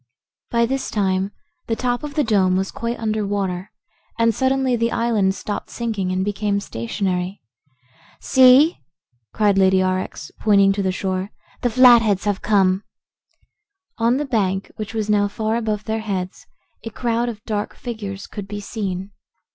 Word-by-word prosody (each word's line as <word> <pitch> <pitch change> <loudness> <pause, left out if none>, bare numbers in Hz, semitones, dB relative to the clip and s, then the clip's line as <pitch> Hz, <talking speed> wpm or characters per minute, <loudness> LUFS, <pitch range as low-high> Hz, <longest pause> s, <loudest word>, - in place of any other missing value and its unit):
By 235 0 +2
this 265 +3 -2
time 190 -1 0 0.4
the 225 - 0
top 245 +1 -1
of 295 -1 -7
the 300 - +2
dome 190 -6 +2
was 190 +1 -1
quite 235 +1 -3
under 215 -1 -1
water 195 -1 -2 0.5
and 230 0 +3
suddenly 260 +1 +1
the 230 0 0
island 215 -5 +1
stopped 205 - -5
sinking 215 -6 -2
and 185 +1 0
became 205 0 0
stationary. 180 - -3 0.8
"See!" 260 +5 +5 0.5
cried 205 -2 +2
Lady 190 0 +4
Aurex, 185 -4 -2
pointing 200 -2 +4
to 200 - -2
the 190 -1 0
shore. 190 +1 -2 0.3
"The 245 - +1
Flatheads 230 -5 +5
have 205 -2 0
come." 195 -2 +2 1.2
On 235 +3 +3
the 295 - -1
bank, 195 -7 -1
which 215 +1 -6
was 215 -2 -1
now 205 -1 +3
far 220 +2 -2
above 215 -3 -2
their 220 0 -2
heads, 190 -4 -4 0.4
a 225 - -5
crowd 235 +1 -1
of 210 -3 -9
dark 210 -2 -3
figures 205 -5 -6
could 205 -2 -8
be 205 0 -5
seen. 200 -2 -4
210 Hz, 155 wpm, -21 LUFS, 195-230 Hz, 1.2 s, See